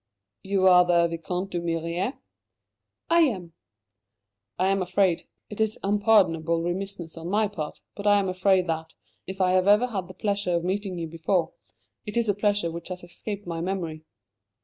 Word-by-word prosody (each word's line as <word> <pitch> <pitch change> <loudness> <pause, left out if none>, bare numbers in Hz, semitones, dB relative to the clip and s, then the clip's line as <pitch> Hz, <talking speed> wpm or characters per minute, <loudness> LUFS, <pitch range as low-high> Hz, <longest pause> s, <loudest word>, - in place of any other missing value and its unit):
"You 195 -1 +1
are 180 -1 +8
the 170 -1 +3
Vicomte 180 +3 -4
d'Humières?" 170 - -2 0.9
"I 335 - +6
am." 190 - +1 1.0
"I 185 +2 +2
am 195 0 +1
afraid 185 -1 +1 0.2
it 210 - -4
is 220 0 +1
unpardonable 185 -6 +3
remissness 175 -1 -4
on 165 +1 -6
my 210 +2 +2
part; 160 -7 -6
but 205 0 -4
I 205 0 +6
am 200 -1 +1
afraid 185 0 +2
that, 160 -1 -4 0.3
if 190 +1 -6
I 185 -1 +3
have 185 +1 +3
ever 210 +4 +6
had 200 -7 -4
the 185 - -11
pleasure 200 -4 0
of 170 - 0
meeting 190 0 -2
you 165 - -3
before, 165 +2 -1 0.5
it 210 +1 -5
is 235 -1 +2
a 205 - +3
pleasure 205 -4 0
which 170 0 -7
has 180 -1 -7
escaped 200 +4 -7
my 165 -1 -4
memory." 170 -4 -3
185 Hz, 170 wpm, -26 LUFS, 170-200 Hz, 1.0 s, are